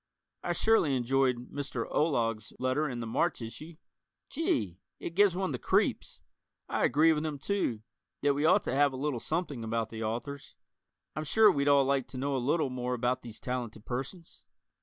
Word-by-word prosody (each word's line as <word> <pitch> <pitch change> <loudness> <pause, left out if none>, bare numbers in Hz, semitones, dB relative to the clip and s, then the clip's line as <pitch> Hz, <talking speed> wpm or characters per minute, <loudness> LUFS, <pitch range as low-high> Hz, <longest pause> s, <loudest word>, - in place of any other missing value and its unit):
I - - -1
surely 220 -11 +3
enjoyed 125 0 +1
Mr. 135 -5 -3
Olog's 115 -8 0
letter 130 +4 0
in 120 -2 -4
the - - -4
March 165 +9 0
issue. 150 +8 -8 0.6
Gee, 105 - -1 0.2
it 170 - -5
gives 200 -1 +4
one 190 -2 -1
the 125 - -3
creeps. - - 0 0.5
I - - +1
agree 160 +2 +4
with 150 0 -2
him, 155 -2 -3
too, 135 - -1 0.4
that 145 0 +4
we 145 +1 -1
ought 180 +6 +5
to - - -2
have 140 0 +3
a - - -5
little 140 -2 -1
something 155 -4 -3
about 115 0 -2
the 110 0 -7
authors. 120 +6 -5 0.6
I'm 155 - -2
sure 215 +7 +5
we'd 140 -4 0
all 140 -1 +5
like 135 -2 +1
to 130 - -8
know 140 +2 -1
a - - +1
little 140 +2 +1
more 125 0 -2
about 125 +1 0
these 115 -3 -10
talented 120 -4 -4
persons. 135 +8 -6
135 Hz, 185 wpm, -30 LUFS, 120-155 Hz, 0.6 s, ought